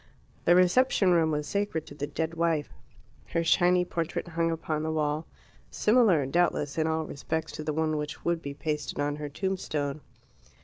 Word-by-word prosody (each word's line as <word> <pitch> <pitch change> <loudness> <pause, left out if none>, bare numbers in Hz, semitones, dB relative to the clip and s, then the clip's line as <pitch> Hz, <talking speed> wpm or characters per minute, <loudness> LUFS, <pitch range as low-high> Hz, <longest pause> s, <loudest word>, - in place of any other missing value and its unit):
The 175 - +6
reception 185 +2 +4
room 165 -2 +4
was 150 -1 -1
sacred 200 -5 -2
to 155 - -11
the 145 0 -4
dead 160 +2 -3
wife. 165 -3 0 0.6
Her 170 - +2
shiny 180 +1 +4
portrait 170 0 -3
hung 165 0 0
upon 160 -2 -2
the 160 - -2
wall 155 0 -1 0.4
similar, 210 - +3
doubtless, 145 -1 +1
in 160 - +2
all 160 0 0
respects 160 +2 -3
to 155 - -6
the 155 - -1
one 155 0 0
which 150 0 -5
would 170 -1 +1
be 140 -2 -6
pasted 150 0 -3
on 145 0 0
her 150 -1 -5
tombstone. 155 -4 -2
160 Hz, 175 wpm, -28 LUFS, 150-175 Hz, 0.6 s, The